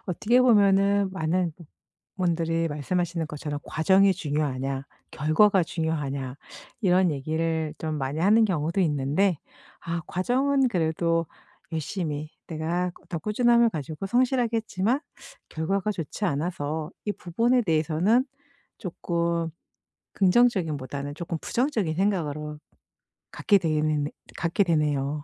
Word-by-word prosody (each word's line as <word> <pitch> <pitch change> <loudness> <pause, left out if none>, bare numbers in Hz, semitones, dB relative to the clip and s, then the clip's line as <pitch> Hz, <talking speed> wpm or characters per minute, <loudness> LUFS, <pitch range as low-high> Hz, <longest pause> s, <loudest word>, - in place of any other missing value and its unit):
어떻게 215 +7 +2
보면은 200 -4 +4
많은 175 0 0 0.6
분들이 165 -2 0
말씀하시는 165 +3 -2
것처럼 150 -1 -5
"과정이 190 +4 +4
중요하냐? 140 -5 -2 0.3
결과가 180 +6 +3
중요하냐?" 140 -6 -3 0.4
이런 185 -3 +3
얘기를 160 +2 -2
좀 155 -1 -3
많이 140 +4 -2
하는 215 +5 +5
경우도 170 -1 0
있는데 150 +4 +1 0.5
아 170 0 -2
과정은 265 +8 +1
그래도 165 -3 0 0.5
열심히 155 -2 -3 0.2
내가 170 +3 -2 0.2
더 170 - -3
꾸준함을 235 +5 +3
가지고 155 +3 -5
성실하게 245 0 +2
했지만 220 +4 0 0.5
결과가 195 +6 -1
좋지 180 +3 -5
않아서 155 -1 -2
이 205 - -1
부분에 235 +9 +1
대해서는 170 - +2 0.5
쪼끔 170 -2 -2 0.6
긍정적임보다는 160 - +1
조금 165 +1 -4
부정적인 230 - 0
생각으로 155 -6 -1 0.7
갖게 205 - +3
되는 155 -3 0 0.3
갖게 170 +4 +1
되네요. 150 -4 0
170 Hz, 285 characters per minute, -26 LUFS, 155-200 Hz, 0.7 s, 하는